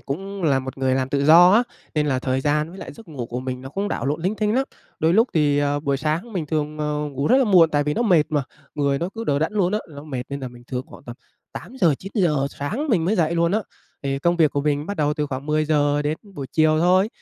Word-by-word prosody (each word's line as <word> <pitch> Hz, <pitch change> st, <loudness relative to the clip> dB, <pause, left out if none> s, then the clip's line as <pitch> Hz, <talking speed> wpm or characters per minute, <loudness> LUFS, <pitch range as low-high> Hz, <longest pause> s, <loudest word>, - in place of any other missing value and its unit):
cũng 190 Hz, +10 st, -6 dB
là 140 Hz, -4 st, +3 dB
một 130 Hz, 0 st, -7 dB
người 130 Hz, -1 st, +1 dB
làm 130 Hz, 0 st, -1 dB
tự 140 Hz, 0 st, 0 dB
do 170 Hz, +4 st, +8 dB
á, 230 Hz, +3 st, +5 dB, 0.3 s
nên 150 Hz, -1 st, +1 dB
là 130 Hz, -3 st, +1 dB
thời 130 Hz, 0 st, -1 dB
gian 150 Hz, +2 st, 0 dB
với 190 Hz, -, -11 dB
lại -, -, -8 dB
giấc 225 Hz, -5 st, -15 dB
ngủ 130 Hz, -7 st, -6 dB
của 125 Hz, +1 st, -5 dB
mình 130 Hz, -1 st, -5 dB
nó 135 Hz, -, -7 dB
cũng 200 Hz, +7 st, -3 dB
đảo -, -, -3 dB
lộn 150 Hz, +3 st, -2 dB
linh 190 Hz, +5 st, 0 dB
tinh 210 Hz, +1 st, 0 dB
lắm. 265 Hz, +1 st, +2 dB, 0.3 s
Đôi 160 Hz, +2 st, +2 dB
lúc 230 Hz, +3 st, +4 dB
thì, 145 Hz, -2 st, +3 dB
ờ, 145 Hz, 0 st, 0 dB
buổi 140 Hz, -2 st, 0 dB
sáng 155 Hz, -, -2 dB
mình 170 Hz, -6 st, -3 dB
thường, 155 Hz, 0 st, -2 dB
ờ, 150 Hz, 0 st, -1 dB
ngủ 140 Hz, +1 st, -3 dB
rất 255 Hz, -, +5 dB
là 270 Hz, -, +4 dB
muộn, 180 Hz, -7 st, +5 dB
tại 145 Hz, -1 st, +1 dB
vì 150 Hz, -, -1 dB
nó 235 Hz, -, 0 dB
mệt 180 Hz, -9 st, +4 dB
mà, 150 Hz, -3 st, 0 dB, 0.3 s
người 140 Hz, -2 st, 0 dB
nó 170 Hz, -, -2 dB
cứ 230 Hz, 0 st, -5 dB
đờ 140 Hz, -6 st, +1 dB
đẫn 160 Hz, +7 st, -1 dB
luôn 190 Hz, -3 st, +1 dB
á, 215 Hz, -, +1 dB
nó 145 Hz, -1 st, -10 dB
mệt 130 Hz, -5 st, -4 dB
nên 140 Hz, 0 st, -5 dB
là 130 Hz, -, -5 dB
mình 120 Hz, 0 st, -15 dB
thường 125 Hz, -1 st, -3 dB
khoảng -, -, -14 dB
tầm 120 Hz, 0 st, -9 dB, 0.4 s
8:00-9:00 175 Hz, -, 0 dB
sáng 215 Hz, -, -4 dB
mình 180 Hz, -9 st, +2 dB
mới 195 Hz, -, +1 dB
dậy 165 Hz, -1 st, +1 dB
luôn 170 Hz, +2 st, +1 dB
á. 215 Hz, -, +2 dB, 0.4 s
Thì 135 Hz, 0 st, -1 dB
công 170 Hz, +4 st, +1 dB
việc 160 Hz, -3 st, +4 dB
của 145 Hz, -, -1 dB
mình 145 Hz, 0 st, -1 dB
bắt 200 Hz, +1 st, -4 dB
đầu 150 Hz, -1 st, +1 dB
từ 150 Hz, -1 st, -2 dB
khoảng 135 Hz, +1 st, -6 dB
10:00 150 Hz, -1 st, +1 dB
đến 150 Hz, +2 st, -1 dB, 0.2 s
buổi 140 Hz, -4 st, -5 dB
chiều 155 Hz, -1 st, +3 dB
thôi, 185 Hz, +4 st, +3 dB
150 Hz, 275 wpm, -22 LUFS, 140-180 Hz, 0.4 s, do